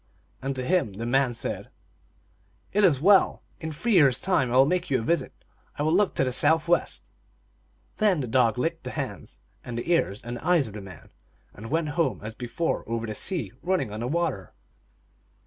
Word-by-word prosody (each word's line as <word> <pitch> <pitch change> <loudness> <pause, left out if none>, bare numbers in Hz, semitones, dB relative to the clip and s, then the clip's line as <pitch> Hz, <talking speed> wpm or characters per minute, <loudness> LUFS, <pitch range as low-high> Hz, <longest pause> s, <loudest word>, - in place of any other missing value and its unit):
And 135 +1 -3
to 130 -1 -3
him 165 - +1
the 115 +4 -5
man 130 0 +1
said, - - -4 0.5
" 95 +2 -37
It 210 +1 +3
is 160 -9 +5
well. 195 +5 +4 0.2
In 160 -2 -5
three 220 +10 -2
years 140 - +5
time 160 -10 +1
I 125 - +2
will 135 - +7
make 180 +3 -1
you 135 - +2
a - - -5
visit. 170 +8 0 0.5
I 145 - -1
will 155 +1 +2
look 195 +1 +2
to - - +2
the 130 -1 -1
southwest." 160 +5 +2 0.9
Then 205 -6 +3
the 130 - -3
dog 115 -2 +2
licked 125 - -2
the - - -5
hands - - -6 0.3
and 120 -1 -6
the 140 +9 -3
ears 105 - 0
and 120 +1 -5
the - - -11
eyes 170 -3 +3
of 110 - -8
the 105 - -7
man, 95 -2 -13 0.4
and 115 +2 -9
went 160 +1 0
home 145 - 0
as 110 +1 -6
before 120 +8 -2
over 115 0 -2
the 110 - -4
sea, 180 - -1
running 175 - -1
on 105 - -5
the 120 - -2
water. 145 - -2
135 Hz, 205 wpm, -26 LUFS, 115-170 Hz, 0.9 s, will